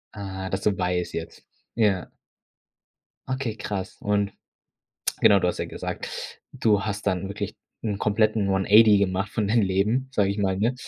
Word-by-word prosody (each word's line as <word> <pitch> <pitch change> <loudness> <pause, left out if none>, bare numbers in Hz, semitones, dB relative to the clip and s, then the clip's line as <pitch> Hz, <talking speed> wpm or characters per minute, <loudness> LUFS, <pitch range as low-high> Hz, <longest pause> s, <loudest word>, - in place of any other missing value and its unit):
Aha, 95 -2 -5
das 95 - -2
du 105 -2 +1
weißt 90 -1 -1
jetzt, 85 0 -6 0.3
ja. 100 -6 +2 1.2
Okay, 130 -4 -2
krass. 100 -3 -5
Und 100 -1 0 0.9
genau, 100 - +7
du 90 - +1
hast - - -2
ja - - -1
gesagt, - - -5 0.4
du 105 -3 +2
hast 105 0 -4
dann 95 -1 0
wirklich 100 - -5 0.3
'n 105 -3 -2
kompletten 105 -1 +2
1 95 0 +1
80 105 0 +7
gemacht 95 0 0
von 105 -2 -1
deinem 115 +2 +3
Leben, 105 +8 +1
sage 105 -6 +2
ich 100 +1 -2
mal, 95 -2 +1
ne? 115 +5 +1
100 Hz, 165 wpm, -25 LUFS, 95-105 Hz, 1.2 s, genau